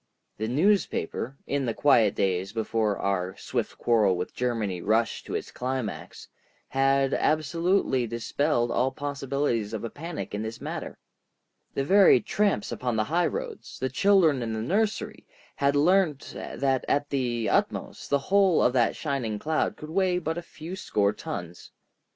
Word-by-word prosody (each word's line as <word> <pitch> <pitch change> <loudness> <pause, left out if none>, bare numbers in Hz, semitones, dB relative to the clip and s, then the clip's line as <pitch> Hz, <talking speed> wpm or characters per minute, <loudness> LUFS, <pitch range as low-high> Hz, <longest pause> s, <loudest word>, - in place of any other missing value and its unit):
The 110 - -1
newspaper, 145 - 0
in 140 -2 -1
the 115 - -1
quiet 115 -8 +4
days 95 +1 0
before 110 -2 0
our 95 -1 -2
swift - - -3
quarrel 105 -6 +3
with 90 - -4
Germany 110 -7 -2
rushed 110 +4 0
to - - -4
its - - -4
climax, 125 -4 -4 0.4
had 135 0 +2
absolutely 155 -3 +1
dispelled 120 +2 0
all 125 +2 +2
possibilities 140 -5 -2
of 110 - -4
a 115 - -4
panic 165 -3 -6
in 105 - -2
this 110 +1 -5
matter. - - -6 0.8
The 135 - 0
very 195 +7 +6
tramps 205 - 0
upon 125 -2 -2
the 110 - +2
high 175 +1 +3
roads, 475 -3 -6
the 130 - -2
children 165 -2 +4
in 115 -1 -3
the 110 0 -3
nursery, 210 - -1 0.3
had 140 0 +2
learnt 160 -1 +2
that 135 -2 -1
at 145 +1 0
the 120 -5 -1
utmost - - -1
the 140 - +4
whole 190 +4 +3
of 125 - +3
that 120 -3 +2
shining 130 -8 -2
cloud 155 +8 -1
could 155 +1 -9
weigh 185 0 +2
but 165 -2 -2
a 175 - -4
few 170 +1 -8
score 105 - 0
tons. 85 0 -7
135 Hz, 155 wpm, -27 LUFS, 110-160 Hz, 0.8 s, very